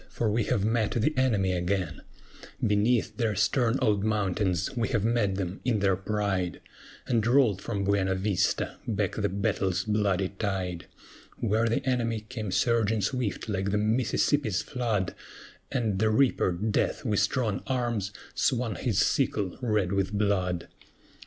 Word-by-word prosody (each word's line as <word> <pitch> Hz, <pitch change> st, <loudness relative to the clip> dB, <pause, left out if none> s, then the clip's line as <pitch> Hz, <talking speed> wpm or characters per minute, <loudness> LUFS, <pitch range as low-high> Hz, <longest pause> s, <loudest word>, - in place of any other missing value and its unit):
for 110 Hz, -3 st, -1 dB
we 110 Hz, +1 st, +1 dB
have 100 Hz, -, 0 dB
met 110 Hz, -1 st, +1 dB
the 120 Hz, +7 st, +1 dB
enemy 110 Hz, -8 st, +2 dB
again; 90 Hz, -2 st, -1 dB, 0.6 s
Beneath 110 Hz, +1 st, +2 dB
their 110 Hz, -3 st, 0 dB
stern 115 Hz, +4 st, +2 dB
old 105 Hz, -4 st, +2 dB
mountains 100 Hz, -2 st, 0 dB
we 120 Hz, -2 st, 0 dB
have 115 Hz, -6 st, 0 dB
met 115 Hz, -4 st, +1 dB
them 95 Hz, 0 st, -4 dB
in 125 Hz, -4 st, +1 dB
their 100 Hz, -2 st, +2 dB
pride, 95 Hz, -2 st, -2 dB, 0.5 s
And 115 Hz, -4 st, +1 dB
rolled 120 Hz, -6 st, +3 dB
from 100 Hz, -3 st, -3 dB
BUENA 95 Hz, -1 st, +1 dB
VISTA 95 Hz, -1 st, 0 dB
back 100 Hz, -3 st, 0 dB
the 100 Hz, -1 st, 0 dB
battle's 95 Hz, -1 st, 0 dB
bloody 100 Hz, -3 st, +1 dB
tide; 95 Hz, -4 st, -3 dB, 0.5 s
Where 110 Hz, +1 st, +1 dB
the 115 Hz, +4 st, -1 dB
enemy 115 Hz, -3 st, 0 dB
came 110 Hz, -2 st, -6 dB
surging 110 Hz, 0 st, +2 dB
swift, 115 Hz, +1 st, -2 dB
like 95 Hz, -2 st, -1 dB
the 105 Hz, -, +1 dB
Mississippi's 110 Hz, +1 st, +1 dB
flood, 110 Hz, -7 st, -1 dB, 0.6 s
And 110 Hz, -7 st, 0 dB
the 110 Hz, +1 st, +3 dB
reaper, 115 Hz, -4 st, +3 dB
Death, 105 Hz, -, -1 dB
with 105 Hz, -4 st, +1 dB
strong 105 Hz, 0 st, 0 dB
arms 120 Hz, -6 st, -1 dB, 0.2 s
swung 125 Hz, -4 st, 0 dB
his 115 Hz, -7 st, -1 dB
sickle 100 Hz, -4 st, +1 dB
red 105 Hz, -7 st, +1 dB
with 100 Hz, -1 st, 0 dB
blood. 95 Hz, -4 st, 0 dB
105 Hz, 145 wpm, -28 LUFS, 95-115 Hz, 0.6 s, rolled